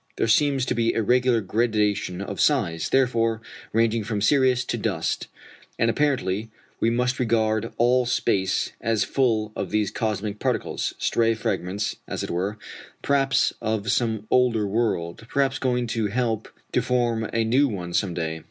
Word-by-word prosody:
There - - 0
seems 135 +2 +3
to - - 0
be 115 0 +1
a 115 - +1
regular 125 +1 +3
gradation 105 -3 0
of 100 -1 -4
size, 95 - +1
therefore, 115 -4 +2 0.3
ranging 115 0 +2
from 105 0 -2
Sirius 125 +2 +3
to - - -2
dust; - - -2 0.5
and 115 +1 +2
apparently 115 -7 0 0.3
we 115 - +2
must 125 +2 0
regard 110 -2 +1
all 125 +1 +3
space 95 -5 0
as 115 -3 +1
full 110 -2 0
of - - -3
these 105 -1 0
cosmic 105 -2 -2
particles - - -2
stray 115 -1 +1
fragments, 100 -3 -2
as - - -4
it - - -4
were, 95 +5 -2 0.5
perhaps 135 -1 +2
of 110 0 -1
some 110 -3 0
older 120 -4 +3
world, 100 -4 -1
perhaps 135 -1 +1
going 125 -2 0
to 115 -2 -1
help 110 0 -1 0.2
to 125 - +2
form 120 -2 0
a 115 0 +1
new 130 +6 +3
one 90 -7 -5
some 90 -1 0
day. 80 -1 -3
115 Hz, 160 wpm, -24 LUFS, 105-125 Hz, 0.5 s, seems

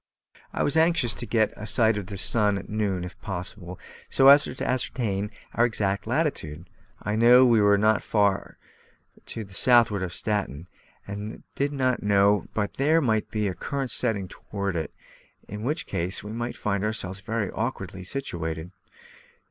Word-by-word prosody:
I - - -1
was 145 - +2
anxious 160 -8 +3
to 115 +5 -6
get 110 -2 +1
a 105 - -7
sight 110 -2 +3
of 100 -3 -5
the 100 0 -7
sun 105 0 +3
at 95 - -8
noon, 100 -4 -2
if 90 - -10
possible, 90 -1 -6 0.3
so 135 0 +6
as 145 +1 +7
to - - -5
ascertain 110 -5 -1 0.2
our 120 - +2
exact 105 -4 0
latitude. 115 - -2 0.4
I 105 +1 -1
knew 120 +3 +7
we 115 -3 +4
were 100 0 +5
not 110 +1 +3
very - - -17
far 100 -3 +1 0.7
to 115 - -5
the 95 -2 -14
southward 115 -2 +4
of 90 -2 -3
Staten; 95 -6 -2 0.4
and 105 +1 -5
I - - -12
did 140 +1 -1
not 130 -3 0
know 100 0 +3
but 105 -2 -2
there 155 +4 +3
might 110 -7 0
be 105 -1 -1
a 95 - -2
current 135 +4 -4
setting 110 -6 +1
us - - -14
toward 100 -3 -5
it, 80 -3 -3 0.6
in 105 +1 -7
which 150 +9 -2
case 90 +3 -2
we 105 - -7
might 120 +2 -4
find 100 -2 -1
ourselves 100 -3 -3
very 105 +1 -3
awkwardly 95 -5 -4
situated. 85 - -4
105 Hz, 180 wpm, -25 LUFS, 95-120 Hz, 0.7 s, as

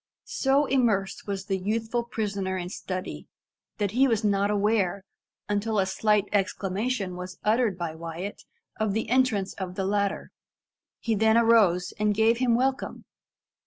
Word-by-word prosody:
So 275 +2 +2
immersed 225 -9 0
was 195 -1 -3
the 195 -1 -1
youthful 225 +4 -1
prisoner 200 -5 -2
in 175 -1 -4
study, 185 - -6 0.5
that 205 -2 -1
he 260 +5 +4
was 225 -3 +1
not 200 -1 +2
aware, 205 -2 +1 0.4
until 210 +1 -1
a 195 - +3
slight 210 +1 +2
exclamation 195 +1 -1
was 180 0 -7
uttered 220 -3 +2
by 170 -3 -3
Wyat, 170 +4 -6 0.4
of 215 -2 0
the 220 0 -2
entrance 245 -7 +2
of 185 -1 -5
the 190 - -2
latter. 200 0 -1 0.7
He 230 - -1
then 220 +1 +4
arose, 210 -7 +4
and 210 -1 +2
gave 225 +2 +3
him 245 -2 +3
welcome. 260 +2 -1
205 Hz, 150 wpm, -26 LUFS, 190-225 Hz, 0.7 s, he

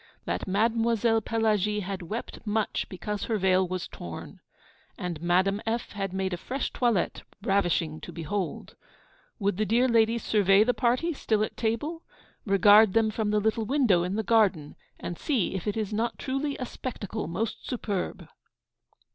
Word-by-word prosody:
That - - -2
Mademoiselle 225 +2 +2
Pelagie 210 -2 +1
had 195 0 -4
wept 210 +7 -5
much 215 0 -1
because 200 +2 -4
her 225 - 0
veil 185 -1 +3
was 185 -1 -3
torn; 85 -1 -9 0.6
and 175 -3 -4
Madame 185 +4 +2
F. 230 +1 -2
had 195 -2 -3
made 190 0 -2
a - - -2
fresh 265 +9 -3
toilette, 235 -7 +1 0.2
ravishing 175 -5 +1
to - - -8
behold. 175 +3 -4 0.6
Would 200 -3 0
the 215 - +1
dear 240 +3 +3
ladies 230 -1 +3
survey 200 -1 +4
the 245 +2 +2
party, 255 +9 +1
still 215 -6 0
at - - -4
table? 270 +9 -2 0.5
Regard 205 +1 +6
them 225 -1 +3
from 215 -1 -1
the 210 0 +2
little 220 +1 0
window 245 -10 +3
in 180 +3 -2
the 220 - -1
garden, 195 -9 +2 0.2
and 175 - -6
see 245 - 0
if 190 +1 -4
it 210 - -1
is 215 -1 -2
not 230 +3 -1
truly 275 +2 -2
a 255 - -3
spectacle 220 -4 -5
the 170 - -6
most 220 +4 -3
superb! 200 - -3
210 Hz, 165 wpm, -27 LUFS, 190-230 Hz, 0.6 s, Regard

